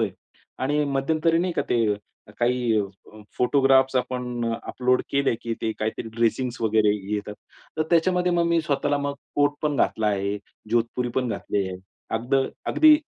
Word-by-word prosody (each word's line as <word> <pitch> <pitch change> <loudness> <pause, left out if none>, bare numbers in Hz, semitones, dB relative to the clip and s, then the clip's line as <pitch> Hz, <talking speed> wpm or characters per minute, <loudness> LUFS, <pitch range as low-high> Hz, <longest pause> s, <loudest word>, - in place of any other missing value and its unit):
आहे 110 -4 +1 0.5
आणि 145 +2 +2
मध्यंतरी 155 +4 +1
नाही 180 0 0
का - - 0
ते 110 -3 +3 0.4
काही 120 -2 +2
अ, 100 +2 -9 0.2
फोटोग्राफ्स 135 0 +4
आपण 125 -1 -2 0.2
अपलोड 125 0 +1
केले 140 -3 +2
की 115 -1 -2
ते 110 - 0
काहीतरी 110 +1 -3
ड्रेसिंग 120 +2 +1
वगैरे 110 -1 +3 0.2
येतात. 105 0 -4 0.4
तर - - +4
त्याच्यामध्ये 180 +1 +3
मग 170 -1 +2
मी 170 0 +3
स्वतःला 145 0 0 0.4
कोट 145 0 +3
पण 150 -2 0
घातला 110 -3 +1
आहे, 100 0 0 0.3
जोधपुरी 120 +1 0
पण 125 -2 +1
घातली 100 -3 -1
आहे. 95 - -5 0.4
अगद 120 +4 -2 0.3
अगदी 310 -1 +7
125 Hz, 150 wpm, -25 LUFS, 110-145 Hz, 0.5 s, अगदी